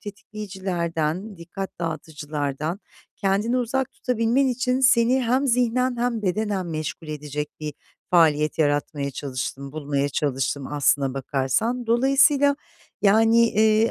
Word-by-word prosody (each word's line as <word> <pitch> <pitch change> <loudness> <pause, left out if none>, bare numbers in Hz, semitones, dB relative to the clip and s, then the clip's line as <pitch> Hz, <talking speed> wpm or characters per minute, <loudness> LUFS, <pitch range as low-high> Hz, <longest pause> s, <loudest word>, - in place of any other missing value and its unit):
tetikleyicilerden, 190 -3 -4
dikkat 190 +3 -7
dağıtıcılardan 155 +1 -4 0.4
kendini 205 +5 +1
uzak 260 +2 -1
tutabilmen 250 +2 +1
için, 255 +1 0
seni 255 -1 +4
hem 255 +4 +1
zihnen 250 0 +1
hem 235 -2 -1
bedenen 195 -1 -1
meşgul 155 0 -5
edecek 150 0 -4
bir 150 -2 -5 0.4
faaliyet 155 -4 +3
yaratmaya 145 -1 0
çalıştım, 135 +1 -5
bulmaya 145 -2 -1
çalıştım 135 -1 -1
aslına 140 -2 +1
bakarsan. 140 - -1
Dolayısıyla, 275 +4 +4 0.5
yani, 225 +3 +5
eee, 220 +1 +3
195 Hz, 110 wpm, -24 LUFS, 150-235 Hz, 0.5 s, yani